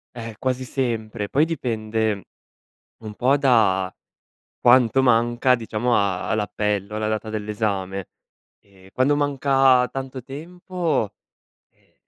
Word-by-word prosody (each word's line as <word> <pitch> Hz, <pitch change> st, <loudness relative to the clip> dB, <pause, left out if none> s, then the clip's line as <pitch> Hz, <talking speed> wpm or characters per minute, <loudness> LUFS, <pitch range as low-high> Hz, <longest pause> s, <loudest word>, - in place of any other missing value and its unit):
Eh, 115 Hz, -2 st, -7 dB
quasi 130 Hz, 0 st, -1 dB
sempre. 115 Hz, -5 st, -3 dB
Poi 150 Hz, +4 st, +3 dB
dipende 110 Hz, -, -2 dB, 0.8 s
un 105 Hz, -1 st, -7 dB
po' 130 Hz, +5 st, +3 dB
da 110 Hz, -9 st, +2 dB, 0.7 s
quanto 125 Hz, +1 st, +5 dB
manca, 120 Hz, +1 st, +3 dB
diciamo, 115 Hz, +1 st, -1 dB
a 95 Hz, -3 st, 0 dB
all'appello, 105 Hz, -1 st, -1 dB
alla 110 Hz, 0 st, -1 dB
data 110 Hz, 0 st, -3 dB
dell'esame. 105 Hz, -3 st, -3 dB, 0.5 s
Ehm, 95 Hz, -1 st, -21 dB
quando 140 Hz, +3 st, +2 dB
manca 135 Hz, -3 st, +3 dB
tanto 130 Hz, -2 st, -6 dB
tempo, 170 Hz, -, -3 dB, 0.6 s
ehm, -, -, -35 dB
115 Hz, 110 wpm, -23 LUFS, 105-130 Hz, 0.8 s, quanto